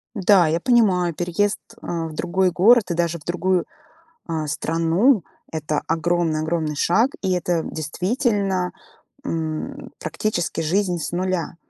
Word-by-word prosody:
Да, 190 -3 +5
я 165 - +1
понимаю, 185 -9 +3
переезд, 180 +5 0 0.2
э, - - -11
в 165 -2 -3
другой 185 +2 +1
город 200 +3 +5
и - - +1
даже 170 0 0
в 150 - -19
другую, 180 +1 0 0.6
а, 160 -2 -2
страну- 165 - +2 0.3
это 155 -1 -2
огромный 165 -1 +1
огромный 160 -1 -1
шаг. 225 - +2
И 190 - 0
это, 175 -2 0
действительно, 190 - -1 0.5
м, 160 - -4
практически 175 -6 -2
жизнь 180 +3 +1
с 150 - -4
нуля. 180 -1 -2
175 Hz, 135 wpm, -22 LUFS, 165-190 Hz, 0.6 s, Да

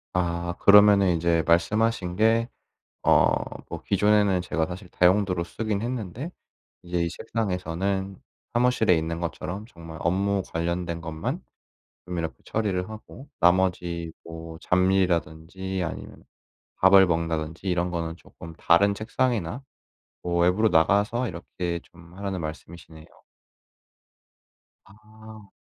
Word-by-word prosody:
아 85 -1 -1
그러면은 100 -1 +7
인제 85 -1 +1
말씀하신 90 +2 +1
게 115 +3 +3 0.6
어 - - +5 0.4
뭐 - - -6
기존에는 105 -1 +3
제가 80 -2 -1
사실 90 +2 -9
다용도로 90 0 +2
쓰긴 105 +2 -3
했는데 120 - -4 0.5
이제 90 -1 -2
이 85 - 0
책상에서는 95 -1 -3 0.4
사무실에 120 -6 +3
있는 80 +1 -3
것처럼 90 +4 -5
정말 80 -6 -11
업무 100 +2 +1
관련된 85 0 -2
것만 80 -1 -4 0.6
좀 90 -1 -5
이렇게 80 -6 -3
처리를 95 -4 -2
하고 110 +5 -11
나머지 90 -2 +1
뭐 80 0 -9
잡일이라든지 90 0 0
아니면 85 - -7 0.5
밥을 95 0 +7
먹는다든지 80 0 -2
이런 90 0 0
거는 85 -1 -3
쪼끔 85 -1 -13
다른 100 +6 +4
책상이나 115 0 -1 0.6
뭐 85 0 0
외부로 95 +6 +3
나가서 105 +8 +2
이렇게 85 0 -4
좀 85 0 -18
하라는 100 -2 -3
말씀이시네요. 80 +1 -9 1.8
아. 110 +1 -15
90 Hz, 280 characters per minute, -25 LUFS, 85-100 Hz, 1.8 s, 그러면은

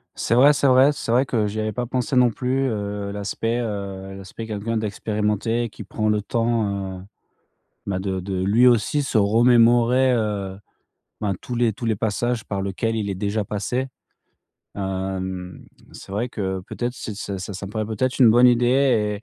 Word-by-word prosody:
C'est - - -1
vrai, 135 +5 +7
c'est 145 0 -1
vrai, 130 +2 +6
c'est 115 - -4
vrai 125 +3 +3
que 115 -5 0
j'y 105 +1 -4
avais 110 0 -1
pas 120 +3 -3
pensé 125 +1 -2
non 125 -1 +5
plus. 130 +3 -1
Heu, 100 -2 -3
l'aspect 110 +3 -2
heu, 100 -4 -5
l'aspect, 95 +3 -9
heu, - - -7
quelqu'un 110 +1 -3
d'expérimenté, 110 +2 -1
qui - - -10
prend 110 -1 -2
le 105 -1 +1
temps, 100 -4 -1
heu, - - -10 0.9
bah, 95 -2 -1
de 95 -1 -2
de 95 0 -3
lui 110 +6 +4
aussi 120 +4 +3
se 130 -4 0
remémorer, 120 +4 +4
heu, 105 -5 -2 0.6
ben, 100 -2 -1
tous 125 - -5
les 120 -2 +2
tous 110 - -8
les 110 -2 +1
passages 115 +3 -1
par 100 -1 -3
lequel 100 +4 -2
il 105 -3 -2
est - - -2
déjà 105 +2 -1
passé. 120 +7 -2 0.9
Hem, 95 -1 -4 0.3
c'est - - -11
vrai 115 +5 -1
que 95 -5 -3
peut-être 120 0 -3
que - - -14 0.2
c'est 100 -1 -5
ça 95 +2 -6
ça 100 +2 -6
me - - -8
paraît 110 0 -2
peut-être 120 +5 -2
une 125 -4 +7
bonne 120 +3 +6
idée 120 -4 +2
110 Hz, 185 wpm, -22 LUFS, 100-120 Hz, 0.9 s, vrai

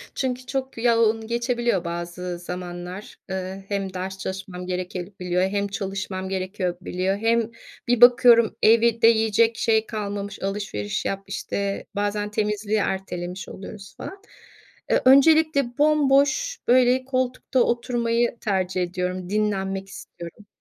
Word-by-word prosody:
çünkü 255 -1 -2
çok 265 -1 -4
yoğun 225 -1 +2
geçebiliyor 235 -4 0
bazı 175 +1 -5
zamanlar. 180 +2 -7
Iıı, 190 +1 -5
hem 195 -2 -3
ders 190 +1 -5
çalışmam 190 -1 -6
gerekebiliyor 180 0 -3
hem 200 +1 0
çalışmam 195 -1 -4
gerekebiliyor. 185 0 -2
Hem 230 +1 +1 0.4
bir 245 -1 +2
bakıyorum 240 -2 +7
evde 230 +1 +5
yiyecek 225 0 +3
şey 220 -1 +2
kalmamış, 205 -2 -5
alışveriş 195 - -3
yap, 195 0 -2
işte, 200 0 -3
bazen 205 +1 -1
temizliği 210 0 -1
ertelemiş 190 -2 -3
oluyoruz 195 0 -10
falan. 390 +1 -8 0.7
Iıı, - - +3
öncelikle 280 -1 +5
bomboş, 300 - +3
böyle, 255 +1 +4
koltukta 255 0 -1
oturmayı 235 -1 0
tercih 185 -3 -1
ediyorum, 180 0 -3
dinlenmek 195 -2 -1
istiyorum. 175 +2 -11
205 Hz, 115 wpm, -24 LUFS, 185-235 Hz, 0.7 s, bakıyorum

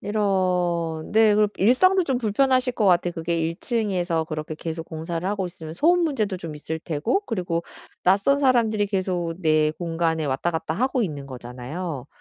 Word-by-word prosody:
이런. 180 -6 0
네 220 -1 +5
그리고 210 0 +3
일상도 370 - +4
좀 265 -5 0
불편하실 255 +3 +2
것 220 - 0
같아요. 175 -1 +3
그게 170 0 -2
1 165 +1 -2
층에서 185 -8 0
그렇게 155 0 -5
계속 165 +1 -5
공사를 165 +2 -4
하고 200 -2 -1
있으면 160 -2 -9
소음 345 - +3
문제도 220 - -1
좀 165 -4 -7
있을 160 +2 -5
테고 165 - -1
그리고 175 -6 -2 0.4
낯선 200 +10 +4
사람들이 230 -6 +2
계속 185 -4 -1
내 155 -2 +3
공간에 165 -1 -1
왔다 140 +5 0
갔다 160 -1 -3
하고 255 - +1
있는 145 -8 -4
거잖아요. 130 +4 -6
175 Hz, 360 characters per minute, -24 LUFS, 160-215 Hz, 0.4 s, 네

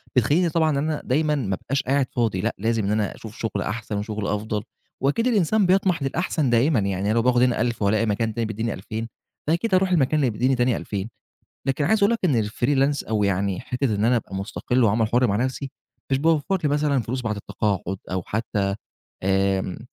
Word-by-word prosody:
بتخلّيني 150 +8 +3
طبعًا 160 0 +2
إن 145 - 0
أنا 150 +1 -1
دايمًا 150 +3 +1
ما 105 -9 -1
أبقاش 140 +3 -1
قاعد 135 0 +1
فاضي 110 -7 0
لأ، 115 +2 -1
لازم 110 +2 0
إن 100 - 0
أنا 105 -1 0
أشوف 110 -1 -10
شُغل 110 -3 -2
أحسن 110 0 -3
وشُغل 105 0 -3
أفضل، 105 0 -2 0.4
وأكيد 145 - +1
الإنسان 215 -2 +3
بيطمَح 185 -4 +2
للأحسن 150 0 0
دائمًا. 120 +3 +3
يعني 100 0 -1
أنا - - +2
لو 115 - +3
باخُد 125 +1 +3
هنا 125 -3 +2
1000 120 -1 -1
وألاقي 105 +2 +2
مكان 110 +1 0
تاني 115 +1 -1
بيدّيني 110 +1 -2
2000، 110 +4 -5 0.4
فأكيد 170 +7 0
أروح 185 0 +4
المكان 155 -3 +3
اللي 135 -4 +2
بيدّيني 125 +5 +1
تاني 125 -1 +2
2000. 100 +1 -4 0.6
لكن 135 +2 +1
عايز 220 +8 +3
أقول 205 - +4
لك 230 - 0
إن 125 -11 +3
الfreelance 135 +5 0
أو 110 -2 +1
يعني 100 -1 0
حتّة 125 -2 -1
إن 105 +1 0
أنا 120 +2 +4
أبقى 105 -4 -4
مُستَقِل 115 +5 0
وعمل 110 +1 +2
حُر 125 +3 +3
مع 100 - +1
نَفْسي، 130 +3 -2 0.4
مش 135 - +2
باوفّر 160 +4 +2
لي - - +3
مثلًا 145 -2 +1
فلوس 125 +4 -3
بعد 110 -2 -2
التقاعُد 100 -2 -2
أو 95 0 -1
حتّى 100 -3 -1 0.5
آآ، 95 -1 +1
120 Hz, 205 wpm, -23 LUFS, 105-145 Hz, 0.6 s, أروح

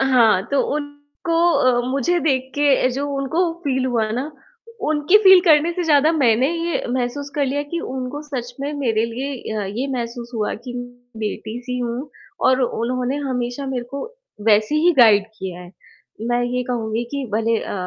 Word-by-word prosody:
अ, - - +3
हाँ 225 -7 +5
तो 280 - +3 0.2
उनको 290 +3 -4 0.2
अ, 250 -1 +3
मुझे 280 +6 +1
देख 265 -4 0
के 285 -3 +3
जो 275 +3 -3
उनको 325 +6 0
फ़ील 265 -2 0
हुआ 230 -4 0
ना, 255 +7 -3 0.6
उनकी 310 +5 +4
फ़ील 380 -1 +9
करने 320 0 +5
से 355 - -2
ज़्यादा 305 +1 +4
मैंने 255 -4 +3
ये 335 0 -2
महसूस 260 +3 -2
कर 290 - +1
लिया 285 +2 -1
कि 340 - 0
उनको 260 +1 -5
सच 250 -5 -6
में 285 +2 -3
मेरे 225 -4 +1
लिए 265 +4 -4 0.2
अ, 205 - -2
ये 215 +8 -3
महसूस 240 -1 -5
हुआ, 215 -2 -1
कि 240 +2 -8
म 245 0 -6 0.3
बेटी-सी 240 +4 -4
हूँ 245 +4 -3 0.4
और 260 0 +4
उन्होंने 250 +3 -1
हमेशा 245 +1 -3
मेरे 255 -2 -3
को 280 - -5 0.5
वैसे 215 +6 +4
ही 330 +3 +4
गाइड 210 -4 +6
किया 185 -2 -6
है। 175 -1 -11 0.6
मैं 240 0 +1
ये 250 +1 -1
कहूँगी 230 -1 -2
कि 280 -2 -3
भले 225 +1 +1
अ, - - -6
255 Hz, 180 wpm, -21 LUFS, 235-290 Hz, 0.6 s, फ़ील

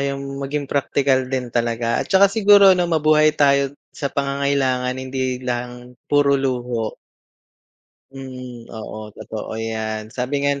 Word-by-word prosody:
'yung 140 0 -3
maging 140 +1 -3
praktikal 135 -1 +1
din 130 -2 -3
talaga 115 0 0
at - - -5
saka 195 +1 +6
siguro 205 -3 +7
'no, 180 -1 +1
mabuhay 155 -1 +4
tayo 140 -1 +3 0.2
sa 140 - -3
pangangailangan 140 -2 0
hindi 130 -1 -2
lang 125 0 -5 0.2
puro 145 -1 +3
luho. 120 -4 -2 1.2
Mm. 125 -3 -9
Oo 110 -1 -8
totoo 110 0 -6
'yan, 110 -1 -4
sabi 135 +3 -2
nga 140 - +3
ni 140 - -4
130 Hz, 135 wpm, -21 LUFS, 120-140 Hz, 1.2 s, siguro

